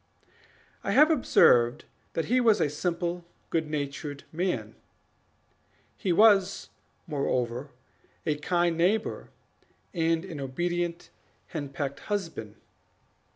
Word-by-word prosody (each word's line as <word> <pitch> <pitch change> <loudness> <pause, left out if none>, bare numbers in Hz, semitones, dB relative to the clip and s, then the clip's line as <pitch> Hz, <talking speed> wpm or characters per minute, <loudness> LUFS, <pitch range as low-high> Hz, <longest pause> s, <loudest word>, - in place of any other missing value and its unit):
I 200 - -1
have 300 +6 +6
observed 120 - +4 0.3
that 165 - -1
he 250 +2 +2
was 225 -3 +4
a 145 - +1
simple, 175 +2 -2 0.3
good 160 -2 0
natured 145 -1 -4
man; 180 +3 -2 1.2
he 190 - -1
was, 200 0 +4 0.4
moreover, 130 -4 -2 0.6
a 150 -1 0
kind 175 +1 +1
neighbor, 190 +6 0 0.6
and 165 0 +1
an 165 -6 -7
obedient 175 +5 -2 0.4
henpecked 140 -2 -4
husband. 165 - -4
170 Hz, 100 wpm, -28 LUFS, 145-185 Hz, 1.2 s, have